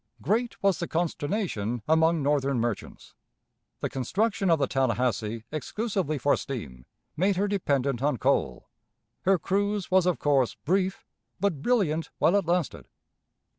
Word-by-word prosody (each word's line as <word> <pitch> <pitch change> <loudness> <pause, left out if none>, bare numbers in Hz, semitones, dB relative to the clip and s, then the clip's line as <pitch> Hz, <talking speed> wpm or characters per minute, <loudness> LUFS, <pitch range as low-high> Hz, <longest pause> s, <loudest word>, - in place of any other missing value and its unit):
Great 230 +3 -1
was 195 -3 +3
the 170 - -2
consternation 150 - -2
among 160 0 +3
Northern 140 -2 +1
merchants. 115 -2 -4 0.7
The - - -1
construction 195 - 0
of 165 - +5
the 140 - +1
Tallahassee 120 -4 0
exclusively 175 - -2
for 140 +2 +2
steam 70 - -7 0.3
made 190 +4 +2
her 200 +3 +1
dependent 140 - 0
on 145 -2 +1
coal; 65 - 0 0.6
her 190 +1 +5
cruise 200 +3 -1
was 185 -1 +4
of 180 - +2
course 135 -4 +2
brief, 190 +3 -1 0.3
but 175 -7 0
brilliant 165 -8 +1
while 175 - +3
it 200 -5 +1
lasted. 175 -3 -1
160 Hz, 135 wpm, -27 LUFS, 135-195 Hz, 0.7 s, of